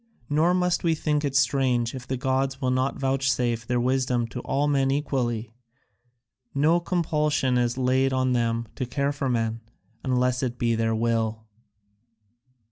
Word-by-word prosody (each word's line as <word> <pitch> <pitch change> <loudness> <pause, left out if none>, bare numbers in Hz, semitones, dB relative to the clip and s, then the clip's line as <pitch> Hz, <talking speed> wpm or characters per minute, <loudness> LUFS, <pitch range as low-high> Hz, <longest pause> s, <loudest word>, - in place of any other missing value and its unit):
Nor 165 +5 +3
must 180 -1 +1
we 165 -2 +2
think 150 -1 0
it 140 -2 -2
strange 130 -3 +2
if 130 -2 -8
the 130 - -2
gods 135 +1 -1
will 130 -2 0
not 130 +2 0
vouchsafe 130 -4 0
their 125 -1 +1
wisdom 125 -1 +1
to 125 - -6
all 140 +4 0
men 135 -2 +2
equally; 120 -6 -1 1.0
no 155 +5 +3
compulsion 150 -6 0
is 120 0 +1
laid 130 +1 +2
on 130 -1 +1
them 115 -1 0
to 130 - -2
care 140 +3 0
for 140 -2 -2
men, 115 -1 -1 0.4
unless 125 -1 +1
it 125 -2 -2
be 120 -1 +1
their 115 0 0
will." 110 -1 -1
130 Hz, 155 wpm, -25 LUFS, 120-140 Hz, 1.0 s, Nor